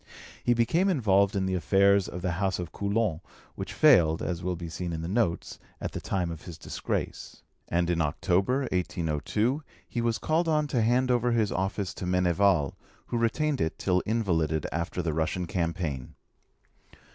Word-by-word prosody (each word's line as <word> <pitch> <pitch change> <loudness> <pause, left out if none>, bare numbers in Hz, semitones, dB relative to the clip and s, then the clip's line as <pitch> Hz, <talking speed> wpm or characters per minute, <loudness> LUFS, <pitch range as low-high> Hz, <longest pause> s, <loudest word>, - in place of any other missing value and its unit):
He 120 - +3
became 160 - +2
involved 100 - +3
in 95 -1 +1
the 95 - -1
affairs 100 +2 +3
of 90 +1 -7
the 90 - 0
House 95 -1 +1
of 90 -2 -5
Coulon, 100 -4 -1 0.3
which - - -6
failed, 85 - +5
as 90 -1 -2
will 90 0 -1
be 85 0 -6
seen 85 +1 -4
in 80 0 -4
the - - -3
notes, 100 -3 -1 0.2
at - - -4
the - - -5
time 90 -3 -1
of 80 -1 -7
his 85 -4 -8
disgrace; - - -4 0.2
and 85 0 +1
in 85 -1 +1
October 95 - +1
1802 90 - -1 0.3
he 120 - -2
was 115 -1 +1
called 165 +2 0
on 155 -1 +2
to 135 -5 0
hand 125 +3 +2
over 120 0 +2
his 110 -3 +1
office 95 0 -2
to 90 - -5
Meneval, 90 -3 +2 0.3
who 120 - -2
retained 145 +5 +1
it 80 - -1
till 90 -1 +1
invalided 80 -9 0
after 85 +2 -2
the 80 -2 -1
Russian 80 +3 -1
campaign. 80 -6 -3
95 Hz, 175 wpm, -28 LUFS, 85-115 Hz, 0.3 s, failed